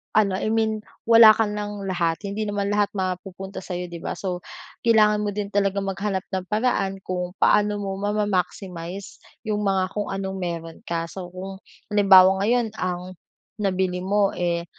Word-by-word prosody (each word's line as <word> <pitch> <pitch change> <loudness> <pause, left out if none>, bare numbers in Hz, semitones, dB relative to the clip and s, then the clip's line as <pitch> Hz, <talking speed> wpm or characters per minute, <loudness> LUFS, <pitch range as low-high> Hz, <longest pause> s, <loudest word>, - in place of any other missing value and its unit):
ano, 200 -3 +3
I - - -2
mean 220 0 +1 0.2
wala 225 -1 +8
ka 225 - +2
ng 210 -1 -4
lahat, 170 0 -1
hindi 205 +2 -3
naman 205 0 -1
lahat 205 0 +2
mapupunta 190 +1 -4
sa'yo, 180 -1 -5
'di 170 - -6
ba? - - -4
So, 180 -2 -3 0.5
kailangan 215 -2 +5
mo 205 -1 -2
din 205 -1 -3
talagang 200 -1 +1
maghanap 195 0 -2
ng 185 -1 -3
paraan 210 -3 0
kung 180 0 -4
paano 210 +1 +3
mo 195 -1 -4
ma-maximize 195 -3 -3 0.2
yung 210 -2 -1
mga 190 -1 +1
kung 210 -1 -3
anong 195 0 -4
meron 165 -2 -5
ka. 165 -1 -1
So, 185 -2 -7
kung 190 +1 -7 0.3
halimbawa 190 -2 +7
ngayon 240 -2 +2
ang, 180 0 -4 0.4
nabili 185 -2 0
mo, 200 +2 +2
eh, 170 -1 -1
195 Hz, 160 wpm, -24 LUFS, 185-210 Hz, 0.5 s, wala